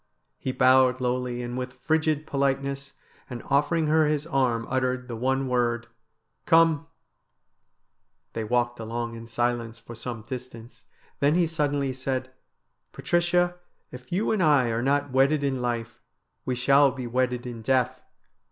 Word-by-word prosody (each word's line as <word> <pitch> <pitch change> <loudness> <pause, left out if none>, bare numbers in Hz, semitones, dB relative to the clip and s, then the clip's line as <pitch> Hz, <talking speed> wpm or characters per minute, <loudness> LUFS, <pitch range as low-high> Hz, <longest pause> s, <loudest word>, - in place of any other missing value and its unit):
He 130 - -2
bowed 130 0 +4
lowly 125 -1 -2
and 120 0 -5
with 125 0 -4
frigid 155 -1 0
politeness, 140 -1 -1 0.4
and 125 -2 -7
offering 150 +4 +2
her 155 0 +3
his 150 0 0
arm 130 -7 0
uttered 130 -1 -1
the 120 - -5
one 130 +3 0
word: 120 -2 0 0.3
' - - -50
Come! 165 -2 +4 0.7
' - - -50
They 115 - -3
walked 120 +1 0
along 115 +1 -4
in 115 0 -9
silence 120 -1 -1
for 115 +1 -11
some 115 -1 -6
distance. 120 -1 -9 0.3
Then 145 +3 +3
he 175 -1 +3
suddenly 145 -4 -1
said: 130 0 -3 0.3
' - - -51
Patricia, 175 +1 +1 0.3
if 125 0 -11
you 195 +5 0
and 215 -3 +1
I 145 -7 +4
are 115 +1 -1
not 140 +2 +1
wedded 140 +3 +3
in 135 -2 -1
life, 120 -2 -3 0.4
we 130 - -1
shall 135 +3 +5
be 130 -1 -6
wedded 125 0 -1
in 120 -2 -6
death. 130 +2 0
130 Hz, 155 wpm, -26 LUFS, 120-145 Hz, 0.7 s, shall